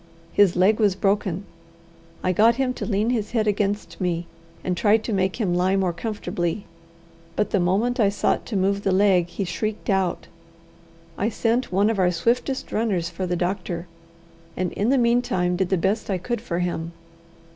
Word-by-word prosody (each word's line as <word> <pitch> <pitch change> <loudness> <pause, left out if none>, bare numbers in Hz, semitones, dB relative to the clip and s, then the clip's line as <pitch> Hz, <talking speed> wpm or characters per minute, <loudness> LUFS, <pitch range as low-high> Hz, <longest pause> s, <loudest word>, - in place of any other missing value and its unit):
His 200 -4 +4
leg 195 +5 +4
was 205 -4 +3
broken. 195 -1 0 0.8
I 185 - +2
got 225 +5 +4
him 260 0 0
to - - -5
lean 215 +2 +1
his 220 -2 -2
head 220 -3 +2
against 205 0 -1
me, 175 -1 -1 0.4
and 180 - -1
tried 210 +4 +3
to 225 - -3
make 190 -1 +1
him 195 -6 +1
lie 180 +2 +2
more 190 -3 +1
comfortably; 180 -2 -3 0.7
but 210 - 0
the 200 - +2
moment 200 +8 +1
I 205 -3 +4
sought 200 - 0
to 225 - -4
move 200 +1 +1
the 195 - 0
leg 185 -2 +4
he 195 +3 -4
shrieked 210 +4 -3
out. 190 -2 0 0.9
I 210 - +1
sent 235 +1 0
one 200 +4 +3
of 215 - -2
our 180 -1 +4
swiftest 235 +10 -1
runners 195 -7 0
for 185 +2 -3
the 180 - 0
doctor, 175 -1 -2 0.7
and 180 -1 -1
in 210 +4 0
the 275 - +4
meantime 235 -7 +2
did 185 0 0
the 190 - +2
best 200 +6 0
I 190 - +1
could 235 +7 -3
for 170 - -3
him. 170 -2 -2
195 Hz, 185 wpm, -23 LUFS, 180-215 Hz, 0.9 s, His